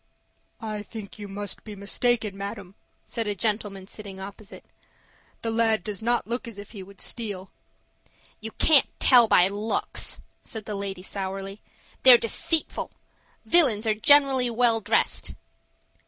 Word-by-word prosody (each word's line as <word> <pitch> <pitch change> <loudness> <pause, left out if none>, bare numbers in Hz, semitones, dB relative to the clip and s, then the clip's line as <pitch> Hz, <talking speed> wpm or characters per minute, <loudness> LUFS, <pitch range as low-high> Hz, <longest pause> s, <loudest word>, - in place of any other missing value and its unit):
"I 215 -1 -4
think 210 0 -10
you 205 - -7
must 200 0 -6
be 210 -2 -9
mistaken, 210 +1 -1
madam," 200 -1 -7 0.3
said 230 -2 -4
a 205 - -1
gentleman 205 -2 -3
sitting 195 -1 -9
opposite. 200 +2 -11 0.8
"The 225 - -1
lad 225 -3 +1
does 205 -3 -5
not 240 +2 0
look 240 +2 -4
as 230 -3 -9
if 205 0 -10
he 205 -4 -9
would 195 +1 -14
steal." 200 -5 -5 0.9
"You 220 - -6
can't 300 -4 +4
tell 245 -3 +6
by 180 -3 +5
looks," 205 +3 -3 0.2
said 220 -3 -8
the 210 - -5
lady, 195 -2 -5
sourly. 195 +1 -6 0.4
"They're 255 -2 +9
deceitful; 300 +8 +1 0.6
villains 255 -11 +6
are 220 - +2
generally 265 +2 +4
well 230 -1 +2
dressed." 205 - 0
215 Hz, 140 wpm, -25 LUFS, 200-230 Hz, 0.9 s, They're